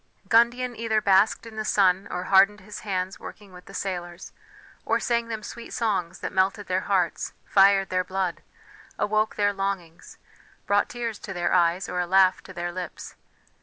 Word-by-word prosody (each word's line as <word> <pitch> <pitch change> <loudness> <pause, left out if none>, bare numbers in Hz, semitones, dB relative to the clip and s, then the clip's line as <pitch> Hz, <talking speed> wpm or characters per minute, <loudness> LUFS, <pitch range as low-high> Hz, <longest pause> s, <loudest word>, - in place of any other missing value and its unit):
Gundian 240 +2 +3
either 220 -1 0
basked 200 +2 +3
in 225 -1 -11
the 215 - -2
sun, 190 -2 +2
or 180 - -3
hardened 195 +2 +4
his 210 +2 -9
hands 190 -2 -3
working 205 -3 -11
with 180 0 -13
the 195 - -13
sailors, 175 -2 -5 0.5
or - - +1
sang 235 -1 0
them 220 -2 -5
sweet 235 +2 -9
songs 195 -7 -2
that - - -4
melted 195 +2 +1
their 185 0 0
hearts, 180 -4 0
fired 195 0 +4
their 185 0 0
blood, 185 -1 -3 0.6
awoke 215 +1 0
their 205 -1 +1
longings, 195 -4 -5 0.5
brought 205 0 +2
tears 235 -3 -4
to 195 - -7
their 175 -1 -1
eyes, 175 +1 +2
or 180 - -3
a 180 - -1
laugh 190 0 +4
to - - -13
their 175 -1 -4
lips. 180 -1 -7
195 Hz, 175 wpm, -25 LUFS, 185-215 Hz, 0.6 s, hardened